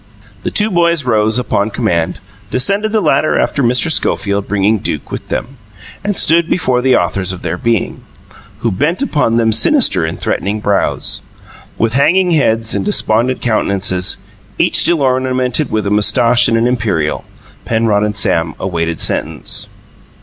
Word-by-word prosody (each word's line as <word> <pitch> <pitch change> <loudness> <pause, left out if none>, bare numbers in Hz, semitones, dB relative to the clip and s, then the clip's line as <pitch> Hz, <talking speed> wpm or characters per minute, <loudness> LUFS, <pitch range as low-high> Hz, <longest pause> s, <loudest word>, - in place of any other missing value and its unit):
The - - -3
two 215 +1 +1
boys 170 -3 +1
rose, 110 -2 +1
upon 105 -4 -1
command, 95 -8 -1 0.3
descended 200 +12 +1
the 220 -1 +1
ladder 140 -1 +1
after 140 - 0
Mr. 125 +5 +2
Schofield, 100 -8 0
bringing 105 +2 +1
Duke 75 -5 -4
with - - -6
them, 135 +4 -5 0.5
and 205 -1 -2
stood 165 +1 +3
before 130 -8 0
the 130 0 +3
authors 95 -2 -1
of 95 - -8
their - - -2
being, 115 -6 -2 0.6
who 115 - 0
bent 150 - -1
upon 145 - 0
them 115 -1 +2
sinister 115 - +3
and 80 - -4
threatening 105 +2 -2
brows. 100 -1 -1 0.6
With 115 0 0
hanging 175 +7 +2
heads 115 -8 +1
and - - -1
despondent 125 - +1
countenances, 100 -5 0 0.4
each - - +2
still 165 -5 +3
ornamented 130 +2 0
with 110 -2 -2
a 100 - -1
moustache 115 +3 +3
and 115 - +1
an 115 - +1
imperial, 105 -11 -1 0.4
Penrod 110 -2 +1
and 105 -1 -2
Sam 80 -5 0
awaited 85 -3 -2
sentence. - - -1
115 Hz, 155 wpm, -14 LUFS, 100-140 Hz, 0.6 s, stood